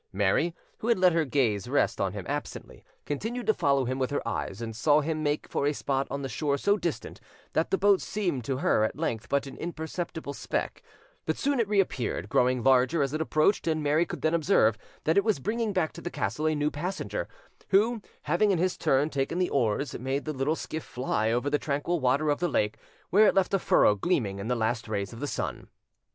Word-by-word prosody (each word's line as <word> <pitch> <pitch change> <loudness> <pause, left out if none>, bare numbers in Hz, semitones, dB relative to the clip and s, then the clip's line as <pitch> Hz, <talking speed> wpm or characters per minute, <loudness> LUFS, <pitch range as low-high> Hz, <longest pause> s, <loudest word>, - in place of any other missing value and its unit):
Mary, 105 - +1 0.2
who 220 - -4
had 235 - +4
let 180 -2 +4
her 165 -1 +2
gaze 120 -8 0
rest - - +1
on - - 0
him - - -6
absently, - - -5 0.2
continued 225 - -3
to 220 - +4
follow 140 -7 +2
him 130 +2 -2
with 130 - 0
her 145 -4 -2
eyes, 100 -3 -3
and 115 -1 -5
saw 145 +6 +4
him 155 +1 -2
make 150 0 -1
for 140 - -1
a 145 - +1
spot 135 -1 -1
on 140 +1 -4
the - - -2
shore 140 +4 -1
so 200 +8 +2
distant 170 -6 -4 0.3
that 160 - +1
the 195 - +2
boat 200 -1 +4
seemed 180 - -2
to 130 +3 -2
her 110 - +2
at 110 - -1
length 120 -8 -3
but 140 0 +1
an 135 - -9
imperceptible 160 -2 -5
speck; - - -3 0.5
but - - 0
soon 280 -2 0
it 230 - +2
reappeared, 190 - 0
growing 125 0 +2
larger 135 +4 +4
as 135 +1 -2
it 155 - -1
approached, 160 +5 +2
and 155 -1 0
Mary 150 +3 +3
could - - -7
then 160 +1 +2
observe 160 - +3 0.3
that 160 +3 +2
it 200 - +5
was 220 -2 +2
bringing 215 - -1
back 185 -5 0
to 170 - -9
the 175 - -4
castle 120 - -2
a 155 - +1
new 150 0 0
passenger, 180 +6 -3 0.4
who, 220 +4 +3 0.2
having 175 +8 +2
in 190 - +3
his 180 +2 0
turn 135 +2 +2
taken 140 +2 -2
the 180 0 0
oars, 125 +1 0
made 135 +3 -2
the 155 - -2
little 140 +3 0
skiff 160 -1 -5
fly 115 -3 -1
over 120 +4 0
the 145 +1 +1
tranquil 150 +4 -1
water 140 +3 +2
of 145 - -1
the 175 0 0
lake, 105 -6 0 0.3
where 210 +3 +6
it - - +3
left 195 0 +2
a 195 - +3
furrow 105 - +4
gleaming 100 - -1
in 100 - -5
the 125 - +1
last 115 0 -1
rays 100 0 -3
of 115 - -9
the 145 - -3
sun. - - -4
150 Hz, 225 wpm, -28 LUFS, 130-175 Hz, 0.5 s, where